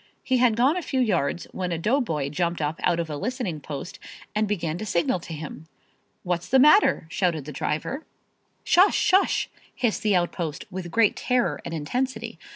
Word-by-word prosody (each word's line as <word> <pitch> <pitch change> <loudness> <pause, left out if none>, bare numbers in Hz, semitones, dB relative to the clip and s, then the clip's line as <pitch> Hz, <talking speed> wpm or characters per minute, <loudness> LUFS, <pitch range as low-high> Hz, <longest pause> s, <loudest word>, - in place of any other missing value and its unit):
He 260 - +2
had 245 -3 +4
gone 260 +7 +3
a 365 - -1
few 270 -5 -2
yards 175 - 0
when 180 -2 -3
a 170 - -1
doughboy 165 - 0
jumped 170 +3 -1
up 150 +1 -2
out 170 -1 +2
of 170 - -1
a 150 - -5
listening 200 - -3
post 145 +3 -7 0.3
and 215 0 +1
began 170 -5 -2
to 215 - -4
signal 175 0 +1
to 170 - -11
him. 155 0 -8 0.6
"What's 175 -1 -2
the 265 - +5
matter?" 300 - +5
shouted 170 -6 0
the 150 - -6
driver. 155 - -3 0.6
"Shush! 370 +4 +5
Shush!" 385 0 +3 0.3
hissed 240 -4 0
the 210 -2 +2
outpost 170 -2 -2
with 185 -2 -5
great 220 +4 +3
terror 250 -1 0
and - - -6
intensity. 245 - -3
180 Hz, 180 wpm, -25 LUFS, 160-250 Hz, 0.6 s, the